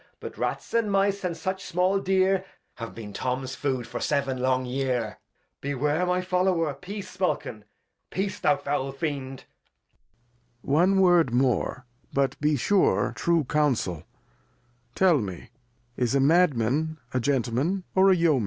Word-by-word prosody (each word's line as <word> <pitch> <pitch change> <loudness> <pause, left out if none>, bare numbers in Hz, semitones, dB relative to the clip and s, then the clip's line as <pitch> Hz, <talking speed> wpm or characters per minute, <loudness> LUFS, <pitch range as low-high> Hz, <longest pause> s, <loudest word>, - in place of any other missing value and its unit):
But - - -8
Rats - - -3
and 230 -3 +1
Mice, 195 0 +1
and 175 -2 -2
such 190 +4 -3
small 185 +2 +1
Deer, 190 0 +2 0.3
Have 115 -1 -7
been 105 -3 -8
Tom's 130 +2 -3
Food 130 -3 -2
for 120 - -6
seven 140 -3 -1
long 130 0 +1
Year. 125 -4 -2 0.4
Beware, 145 +5 0
my 180 0 +1
Follower; 180 -4 +1
Peace, 185 +7 -7
Smulkin, 125 - -2 0.4
Peace, 195 +1 -3
thou 145 -2 +3
foul 135 -1 -2
Fiend. 135 -3 -4 1.2
Lear. 140 - -2
One 185 +5 +4
Word 175 -7 +4
more, 125 0 0 0.3
but 135 -1 +1
be 150 0 +2
sure 190 +9 +2
true 170 -2 +2
Councel; 125 - 0 0.9
tell 180 -6 +4
me, 100 -1 -6 0.5
is 125 +1 +1
a - - +4
Madman 155 -1 +2 0.2
a 130 - +1
Gentleman, 135 - 0
or 190 +1 +5
a 190 - +6
Yeoman 165 -5 +3
145 Hz, 145 wpm, -26 LUFS, 130-180 Hz, 1.2 s, a